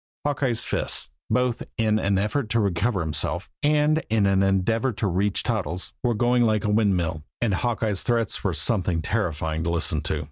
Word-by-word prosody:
Hawkeye's 135 Hz, -5 st, 0 dB
fists, -, -, -1 dB, 0.2 s
both 125 Hz, -1 st, +1 dB, 0.2 s
in 110 Hz, -1 st, +2 dB
an 100 Hz, -2 st, +1 dB
effort 105 Hz, +5 st, -1 dB
to 115 Hz, -, +2 dB
recover 100 Hz, +1 st, +1 dB
himself 80 Hz, -2 st, -2 dB
and 150 Hz, +1 st, +3 dB
in 110 Hz, -2 st, +3 dB
an 95 Hz, -1 st, +3 dB
endeavor 100 Hz, +6 st, +2 dB
to 105 Hz, -, -3 dB
reach 100 Hz, +2 st, 0 dB
Toddles, 95 Hz, -6 st, -3 dB
were 120 Hz, -2 st, +1 dB
going 120 Hz, +2 st, +3 dB
like 110 Hz, -2 st, +2 dB
a 105 Hz, -, +1 dB
windmill; 90 Hz, -8 st, +1 dB, 0.2 s
and 115 Hz, -4 st, +1 dB
Hawkeye's 110 Hz, -1 st, -1 dB
threats 115 Hz, -3 st, -1 dB
were -, -, 0 dB
something 85 Hz, -3 st, 0 dB
terrifying 80 Hz, -6 st, -1 dB
to 85 Hz, -, -1 dB
listen 80 Hz, -3 st, 0 dB
to. -, -, -2 dB
105 Hz, 175 wpm, -24 LUFS, 90-120 Hz, 0.2 s, and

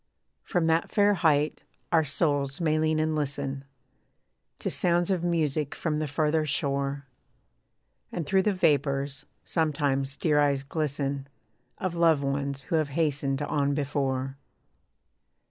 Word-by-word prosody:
From 175 Hz, -5 st, 0 dB
that 165 Hz, +1 st, +2 dB
fair 205 Hz, -1 st, +4 dB
height, 155 Hz, -4 st, +2 dB, 0.3 s
our 165 Hz, -2 st, +4 dB
souls 145 Hz, -1 st, 0 dB
may 155 Hz, -2 st, +2 dB
lean 155 Hz, 0 st, +2 dB
and 155 Hz, 0 st, +1 dB
listen 140 Hz, -2 st, -2 dB, 0.9 s
To -, -, -3 dB
sounds 175 Hz, +1 st, +1 dB
of 180 Hz, -3 st, 0 dB
music 155 Hz, -4 st, 0 dB
from 150 Hz, -2 st, -1 dB
the 155 Hz, -, -1 dB
farther 155 Hz, +2 st, +1 dB
shore, 140 Hz, -1 st, -1 dB, 1.1 s
And 170 Hz, -, -3 dB
through 190 Hz, +5 st, +3 dB
the 210 Hz, -, +2 dB
vapours, 140 Hz, -4 st, +1 dB, 0.2 s
sometimes 140 Hz, -4 st, 0 dB
dear 150 Hz, -3 st, +2 dB
eyes 140 Hz, -2 st, +2 dB
glisten 140 Hz, -2 st, -2 dB, 0.5 s
Of 185 Hz, -4 st, -2 dB
loved 165 Hz, -4 st, +3 dB
ones 140 Hz, 0 st, -2 dB
who 165 Hz, -, 0 dB
have 155 Hz, -2 st, 0 dB
hastened 145 Hz, -2 st, 0 dB
on 145 Hz, -1 st, 0 dB
before. 135 Hz, -2 st, -2 dB
145 Hz, 130 wpm, -27 LUFS, 140-160 Hz, 1.1 s, fair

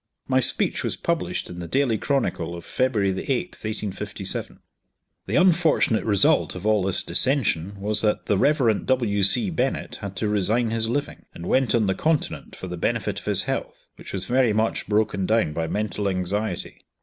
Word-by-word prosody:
My 130 Hz, -1 st, +3 dB
speech 130 Hz, -, +1 dB
was -, -, -1 dB
published -, -, -2 dB
in 90 Hz, -, -8 dB
the 85 Hz, -, -6 dB
Daily 130 Hz, +4 st, +1 dB
Chronicle 105 Hz, -, -1 dB
of 85 Hz, -, -9 dB
February 110 Hz, -7 st, +1 dB
8th, 135 Hz, -, -2 dB
1857. 105 Hz, -3 st, -4 dB, 0.7 s
The -, -, -1 dB
unfortunate 170 Hz, -, +3 dB
result 100 Hz, -4 st, +3 dB
of 90 Hz, +2 st, -7 dB
all 110 Hz, -1 st, +3 dB
this 95 Hz, 0 st, +1 dB
dissension 100 Hz, -, 0 dB
was 105 Hz, +1 st, +1 dB
that 105 Hz, -1 st, 0 dB
the 105 Hz, -, +2 dB
Rev. 120 Hz, -1 st, +2 dB
W. 115 Hz, -6 st, +1 dB
C. 180 Hz, -, +3 dB
Bennett 135 Hz, -4 st, -2 dB
had 100 Hz, -2 st, -7 dB
to 110 Hz, -, -1 dB
resign 105 Hz, +3 st, +1 dB
his 115 Hz, 0 st, 0 dB
living, 145 Hz, +4 st, -3 dB
and 85 Hz, -, -8 dB
went 130 Hz, +4 st, +2 dB
on 115 Hz, -2 st, +2 dB
the 95 Hz, -, +1 dB
continent 155 Hz, +7 st, -1 dB
for 95 Hz, -, -7 dB
the 90 Hz, 0 st, -5 dB
benefit 105 Hz, 0 st, -1 dB
of -, -, -16 dB
his 105 Hz, -3 st, +2 dB
health, -, -, -5 dB
which -, -, -10 dB
was 95 Hz, -1 st, -3 dB
very 125 Hz, 0 st, +2 dB
much 110 Hz, +1 st, 0 dB
broken 105 Hz, -3 st, +1 dB
down 110 Hz, -8 st, +2 dB
by 80 Hz, +1 st, -2 dB
mental 105 Hz, 0 st, -2 dB
anxiety. 95 Hz, +1 st, -3 dB
105 Hz, 180 wpm, -24 LUFS, 95-125 Hz, 0.7 s, My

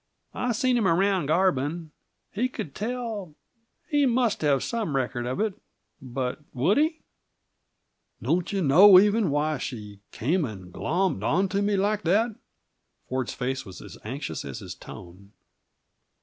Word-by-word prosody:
I've 245 Hz, -2 st, -1 dB
seen 255 Hz, +2 st, +2 dB
him 220 Hz, -5 st, +2 dB
around 190 Hz, -2 st, +2 dB
Garbin. 160 Hz, -1 st, +1 dB, 0.4 s
He 245 Hz, +6 st, -1 dB
could 155 Hz, -, -6 dB
tell 220 Hz, -7 st, -4 dB, 0.5 s
he 290 Hz, -2 st, +3 dB
must 240 Hz, -2 st, +1 dB
have 140 Hz, -3 st, +2 dB
some 220 Hz, -, -2 dB
record 125 Hz, -2 st, -1 dB
of 130 Hz, -, -3 dB
it; 215 Hz, -1 st, 0 dB, 0.5 s
but 130 Hz, 0 st, -3 dB, 0.2 s
would 165 Hz, -, +3 dB
he?" 315 Hz, +1 st, +1 dB, 1.2 s
"Don't 175 Hz, +1 st, 0 dB
you 195 Hz, -2 st, 0 dB
know, 180 Hz, +7 st, +8 dB
even, 210 Hz, 0 st, +3 dB
why 150 Hz, 0 st, 0 dB
she 105 Hz, -7 st, -7 dB
came 165 Hz, +9 st, 0 dB
and 95 Hz, -8 st, -7 dB
glommed 180 Hz, -, 0 dB
onto 190 Hz, -, +1 dB
me 205 Hz, 0 st, +1 dB
like 205 Hz, +2 st, +1 dB
that?" 215 Hz, +7 st, +2 dB, 0.8 s
Ford's 130 Hz, -1 st, -3 dB
face 130 Hz, +1 st, -2 dB
was 95 Hz, -3 st, -11 dB
as -, -, -11 dB
anxious 120 Hz, -, -5 dB
as 70 Hz, -2 st, -6 dB
his -, -, -7 dB
tone. 95 Hz, +3 st, -12 dB
170 Hz, 145 wpm, -26 LUFS, 130-210 Hz, 1.2 s, know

